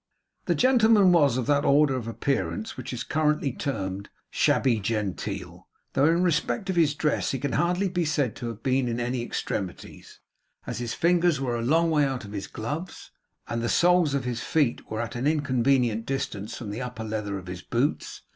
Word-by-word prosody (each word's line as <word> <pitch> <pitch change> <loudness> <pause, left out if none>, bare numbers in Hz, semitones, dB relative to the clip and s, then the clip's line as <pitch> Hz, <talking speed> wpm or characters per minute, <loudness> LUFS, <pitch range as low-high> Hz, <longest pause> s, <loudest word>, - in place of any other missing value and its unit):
The - - +1
gentleman 225 -6 +5
was 145 -8 +4
of 125 - -1
that 145 0 +2
order 140 -1 +4
of 120 -3 -4
appearance 110 -5 -2
which 130 0 -6
is 125 - -4
currently 150 -2 +1
termed 100 -9 -4 0.2
shabby 120 -5 +2
genteel, 100 -4 -4 0.3
though 140 +3 +4
in 170 +2 +3
respect 185 +4 0
of - - -4
his 155 -4 +3
dress 150 -1 0
he 135 - -1
can 140 0 -3
hardly 180 +6 +1
be 180 -1 -1
said 145 -6 0
to 120 - -5
have 115 -1 -7
been 130 -1 +1
in 120 0 -2
any 120 +1 -1
extremities, 95 -5 -5 0.5
as - - -4
his 120 -2 -3
fingers 175 -3 +3
were 125 -3 -1
a 115 - -2
long 165 +7 +2
way 150 -2 +3
out 135 -5 -2
of 100 - -10
his 100 -2 -5
gloves, 150 +11 -6 0.4
and 115 0 -2
the 120 - -1
soles 175 -4 +3
of 140 - -1
his 120 -1 -3
feet 145 -7 0
were 110 +1 -2
at 115 +1 -5
an 125 +4 -1
inconvenient 130 -6 +1
distance 115 -5 -3
from 110 -5 -6
the 110 +5 -5
upper 125 -3 -5
leather 105 -2 -3
of 95 - -9
his 90 0 -7
boots. 125 +5 -2
130 Hz, 195 wpm, -26 LUFS, 115-150 Hz, 0.5 s, gentleman